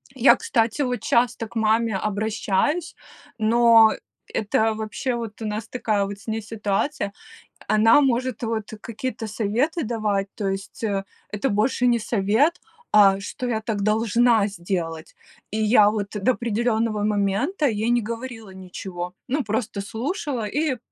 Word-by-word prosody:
Я, 260 +1 +6
кстати, 230 +3 0
вот 250 -2 -2
часто 235 -1 +1
к 195 - -19
маме 220 -1 +2
обращаюсь, 215 - -1 0.4
но 225 0 +6 0.4
это 220 +1 +1
вообще, 220 +4 -3
вот 230 -2 -6
у - - -3
нас 215 +1 -4
такая 215 -5 0
вот 200 0 -7
с 200 - -18
ней 225 0 -2
ситуация. 210 +3 -2 0.6
Она 225 +6 +5
может 255 -3 0
вот 220 -2 -3
какие-то 230 0 -5
советы 235 - -1
давать, 215 -4 -1
то 205 - -3
есть, 195 +3 -5
э, 200 -3 0 0.3
это 210 +6 -1
больше 225 +4 +1
не 240 -1 +3
совет, 225 - +1 0.3
а 195 -2 +6
что 245 +5 -5
я 220 -2 -1
так 215 -2 -3
должна 220 +1 +3
сделать. 170 -4 -4 0.4
И 215 - -2
я 210 -1 +6
вот 210 -1 -2
до 225 - +4
определенного 230 -2 0
момента 210 - 0
ей 220 -1 0
не 240 0 +3
говорила 230 -1 -6
ничего, 180 -1 -7
ну, 275 +3 0
просто 215 -1 -2
слушала 240 - -3
и 290 +4 -1
220 Hz, 145 wpm, -23 LUFS, 205-240 Hz, 0.6 s, Я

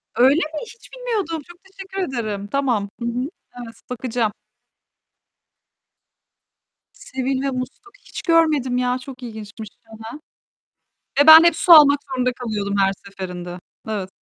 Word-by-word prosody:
Öyle 260 +4 +5
mi? 310 0 -4
Hiç 460 +1 -16
bilmiyordum. 425 -11 -3
Çok 345 0 -14
teşekkür 385 0 -8
ederim. 215 -6 -4
Tamam. 235 -5 -1
Hı 235 - -5
hı. 250 +4 -2 0.4
Evet 230 - -12
bakacağım. 245 -3 -2 2.6
Sebil 260 0 -4
ve 275 -1 -1
musluk. 255 +11 -7 0.2
Hiç - - -8
görmedim 305 -7 +2
ya 250 0 0
çok 255 -1 -11
ilginçmiş. 220 -2 -9 0.2
Hı 225 - -17
hı. 220 - -12 1.2
Ve - - -3
ben 320 +1 +11
hep 340 -2 +4
su 350 - +2
almak 290 -2 +8
zorunda 255 -2 -1
kalıyordum 210 -4 -3
her 195 0 +3
seferinde. 180 -2 -7 0.3
Evet. 195 -3 -3
255 Hz, 135 wpm, -21 LUFS, 220-310 Hz, 2.6 s, ben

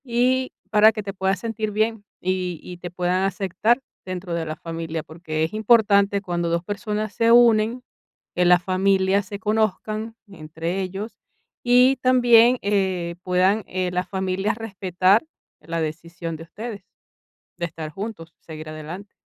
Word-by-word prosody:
Y, 255 +1 +1 0.2
para 215 +1 +7
que 215 -1 -5
te 195 0 -5
puedas 190 0 0
sentir 220 -2 -3
bien, 215 0 0 0.2
y 180 -2 -2
y 180 - -9
te 175 0 -7
puedan 180 +1 0
aceptar 195 +6 +1 0.2
dentro 185 -1 -5
de 170 -1 -2
la 155 0 -4
familia. 165 -1 -5
Porque 160 -1 -4
es 160 - -2
importante, 205 -2 +4
cuando 175 -3 -2
2 170 0 0
personas 210 +1 -3
se 230 0 +3
unen, 235 0 +5 0.5
que 180 - +2
la 180 0 +6
familia 190 +1 +2
se 200 0 -8
conozcan 215 +1 -1
entre 165 0 -5
ellos, 195 +3 -5 0.5
y 250 +2 +5
también, 245 -1 +5
eh, 190 -4 0
puedan, 185 +4 +2
eh, 185 -1 -2
las 180 +1 -2
familias 190 +2 -1
respetar, 195 -2 +1 0.4
la 165 +2 -4
decisión 165 +1 -5
de 160 - -9
ustedes. 205 +4 -8 0.8
De 170 - -1
estar 160 -2 -7
juntos, 185 -3 -7
seguir 155 -1 -9
adelante. 160 +6 -8
190 Hz, 150 wpm, -23 LUFS, 175-215 Hz, 0.8 s, para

